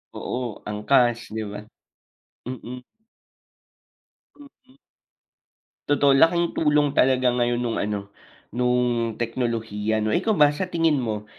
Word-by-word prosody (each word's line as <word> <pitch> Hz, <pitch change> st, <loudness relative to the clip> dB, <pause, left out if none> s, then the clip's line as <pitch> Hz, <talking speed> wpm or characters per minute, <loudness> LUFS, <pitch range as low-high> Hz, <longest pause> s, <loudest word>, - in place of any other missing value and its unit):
Oo, 125 Hz, -4 st, -5 dB
Angkas, 120 Hz, +2 st, +1 dB
'di 110 Hz, 0 st, -4 dB
ba? 105 Hz, -, -6 dB, 0.8 s
Mm. 125 Hz, 0 st, -8 dB, 1.6 s
Mm. 270 Hz, -2 st, -19 dB, 1.1 s
Totoo. 145 Hz, -1 st, +4 dB
Laking 170 Hz, +4 st, +3 dB
tulong 150 Hz, -2 st, +2 dB
talaga 130 Hz, -1 st, +3 dB
ngayon 120 Hz, 0 st, +1 dB
nung 120 Hz, -2 st, -2 dB
ano, 100 Hz, -1 st, -4 dB, 0.4 s
nung 125 Hz, -2 st, 0 dB
teknolohiya, 115 Hz, -3 st, -2 dB
'no. 110 Hz, -, 0 dB
Ikaw 220 Hz, -, +1 dB
ba, 150 Hz, -1 st, +6 dB
sa 180 Hz, +5 st, -3 dB
tingin 165 Hz, -4 st, +1 dB
mo 105 Hz, -3 st, -4 dB
125 Hz, 110 wpm, -23 LUFS, 115-145 Hz, 1.6 s, ba